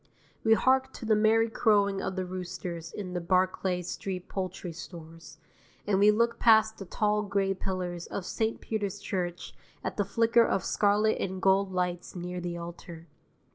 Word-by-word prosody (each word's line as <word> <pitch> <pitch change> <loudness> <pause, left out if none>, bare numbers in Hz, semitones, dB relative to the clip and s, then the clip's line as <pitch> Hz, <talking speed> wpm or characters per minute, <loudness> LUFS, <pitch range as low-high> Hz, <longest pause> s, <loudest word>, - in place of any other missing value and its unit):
We 225 0 +5
hark 265 +2 +2
to - - -8
the 220 -1 +4
merry 220 +2 +4
crowing 200 -3 +2
of 190 - -3
the 185 -1 -2
roosters 175 -2 -6
in 185 -3 -6
the 180 - -2
Barclay 185 0 +1
Street 185 +1 -5
poultry 185 -2 -4
stores; 165 -1 -11 0.5
and 195 -2 +2
we 205 +1 +6
look 235 +2 +2
past 220 -1 +5
the 195 - -6
tall 210 +3 +1
gray 195 -1 0
pillars 180 -2 -4
of 190 - -5
St. 220 +4 -1
Peter's 205 -4 -3
Church 175 -2 -4 0.3
at - - -4
the 205 - +2
flicker 230 +4 +3
of 195 -4 0
scarlet 210 +1 +2
and 190 0 -3
gold 190 +1 +3
lights 180 -1 -2
near 180 0 -5
the 175 -1 -4
altar. 170 -1 -9
190 Hz, 170 wpm, -29 LUFS, 180-210 Hz, 0.5 s, we